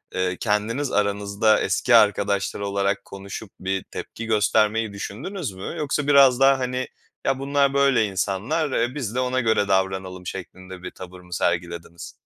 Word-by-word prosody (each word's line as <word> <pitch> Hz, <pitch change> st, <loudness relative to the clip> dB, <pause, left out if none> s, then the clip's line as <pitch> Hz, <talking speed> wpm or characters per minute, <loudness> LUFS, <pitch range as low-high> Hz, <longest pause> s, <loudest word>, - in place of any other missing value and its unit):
eee, 90 Hz, -1 st, 0 dB
kendiniz 115 Hz, +6 st, 0 dB
aranızda 100 Hz, +1 st, +2 dB
eski 125 Hz, -2 st, +2 dB
arkadaşlar 100 Hz, -2 st, +3 dB
olarak 100 Hz, 0 st, -1 dB
konuşup 100 Hz, +1 st, -8 dB
bir 95 Hz, 0 st, -2 dB
tepki 115 Hz, -, -7 dB
göstermeyi 110 Hz, 0 st, +2 dB
düşündünüz 135 Hz, -, -5 dB
mü? 95 Hz, -, -7 dB
Yoksa 145 Hz, -1 st, -1 dB
biraz 135 Hz, -3 st, +6 dB
daha, 135 Hz, 0 st, +5 dB
hani, 125 Hz, 0 st, -2 dB, 0.4 s
"Ya, 135 Hz, -1 st, +1 dB
bunlar 140 Hz, 0 st, +1 dB
böyle 140 Hz, -5 st, +3 dB
insanlar, 105 Hz, -, -1 dB
eee, 120 Hz, +3 st, 0 dB
biz 120 Hz, -6 st, -4 dB
de 130 Hz, -, +1 dB
ona 130 Hz, 0 st, 0 dB
göre 110 Hz, -4 st, +2 dB
davranalım." 95 Hz, -1 st, -1 dB
şeklinde 95 Hz, 0 st, -8 dB
bir 90 Hz, -, -6 dB
tavır 90 Hz, 0 st, -11 dB
mı 90 Hz, 0 st, -11 dB
sergilediniz? 85 Hz, -1 st, -3 dB
105 Hz, 150 wpm, -23 LUFS, 95-130 Hz, 0.4 s, biraz